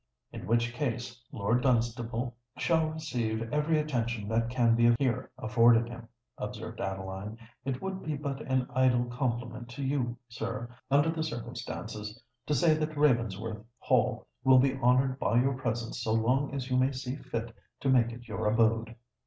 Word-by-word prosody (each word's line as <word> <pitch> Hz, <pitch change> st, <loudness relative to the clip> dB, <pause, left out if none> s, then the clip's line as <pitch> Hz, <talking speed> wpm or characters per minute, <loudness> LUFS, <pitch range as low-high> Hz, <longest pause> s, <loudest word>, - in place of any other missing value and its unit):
"In -, -, -7 dB
which 120 Hz, +1 st, +2 dB
case 120 Hz, -2 st, -3 dB
Lord 115 Hz, +4 st, +1 dB
Dunstable 120 Hz, -1 st, 0 dB, 0.2 s
shall 155 Hz, +5 st, +2 dB
receive 120 Hz, -7 st, -3 dB
every 150 Hz, +2 st, +2 dB
attention 120 Hz, -8 st, -1 dB
that 115 Hz, +1 st, +1 dB
can 120 Hz, -2 st, +3 dB
be 120 Hz, 0 st, +5 dB
here 125 Hz, -4 st, 0 dB
afforded 115 Hz, +1 st, +4 dB
him," 120 Hz, -1 st, -9 dB, 0.3 s
observed -, -, -5 dB
Adeline. 95 Hz, +2 st, -4 dB, 0.3 s
"It 135 Hz, -1 st, -3 dB
would 190 Hz, 0 st, -3 dB
be 155 Hz, -1 st, -2 dB
but 140 Hz, -1 st, -4 dB
an 130 Hz, -1 st, 0 dB
idle 125 Hz, -1 st, +3 dB
compliment 120 Hz, -1 st, -3 dB
to 125 Hz, +3 st, -6 dB
you, 130 Hz, -3 st, -1 dB
sir, 115 Hz, +1 st, -5 dB
under 145 Hz, +4 st, +4 dB
the 165 Hz, -1 st, -3 dB
circumstances, 115 Hz, -6 st, -5 dB, 0.3 s
to 150 Hz, -, +2 dB
say 155 Hz, +5 st, +5 dB
that 155 Hz, 0 st, -2 dB
Ravensworth 115 Hz, -6 st, +1 dB
Hall -, -, +1 dB, 0.2 s
will 130 Hz, -1 st, +7 dB
be 130 Hz, +1 st, +4 dB
honoured 130 Hz, +1 st, +2 dB
by 115 Hz, +3 st, +3 dB
your 135 Hz, +2 st, +2 dB
presence 115 Hz, -2 st, -3 dB
so 110 Hz, -1 st, 0 dB
long 125 Hz, +5 st, +2 dB
as 135 Hz, -2 st, -3 dB
you 125 Hz, -, +3 dB
may 130 Hz, +2 st, +3 dB
see 130 Hz, 0 st, -4 dB
fit 115 Hz, -4 st, -5 dB, 0.3 s
to 135 Hz, -, +1 dB
make 120 Hz, -3 st, +4 dB
it 120 Hz, +1 st, -10 dB
your 105 Hz, -1 st, -2 dB
abode." 115 Hz, +1 st, +2 dB
120 Hz, 165 wpm, -30 LUFS, 115-135 Hz, 0.3 s, will